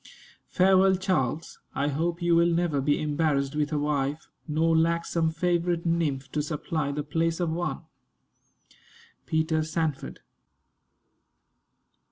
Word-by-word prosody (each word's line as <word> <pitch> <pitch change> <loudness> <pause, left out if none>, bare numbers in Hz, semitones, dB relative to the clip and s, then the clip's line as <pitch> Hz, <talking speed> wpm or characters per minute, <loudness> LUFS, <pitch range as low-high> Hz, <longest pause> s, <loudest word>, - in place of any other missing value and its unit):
Farewell, 190 +1 +4
Charles. 165 -5 -2 0.2
I 140 +1 0
hope 170 +4 -2
you 170 -1 +3
will 170 +1 +4
never 165 -4 +1
be 145 +2 +1
embarrassed 145 -2 0
with 150 0 0
a 150 - 0
wife, 145 0 -1 0.2
nor 160 +2 +2
lack 170 +1 +2
some 165 -1 0
favorite 170 +1 0
nymph 145 -6 -1
to 150 - -1
supply 150 -1 -2
the 145 +1 -3
place 165 +3 -1
of 170 -2 0
one. 175 +2 -3 1.5
PETER 160 0 +1
SANFORD. 155 -2 -3
160 Hz, 125 wpm, -27 LUFS, 150-170 Hz, 1.5 s, Farewell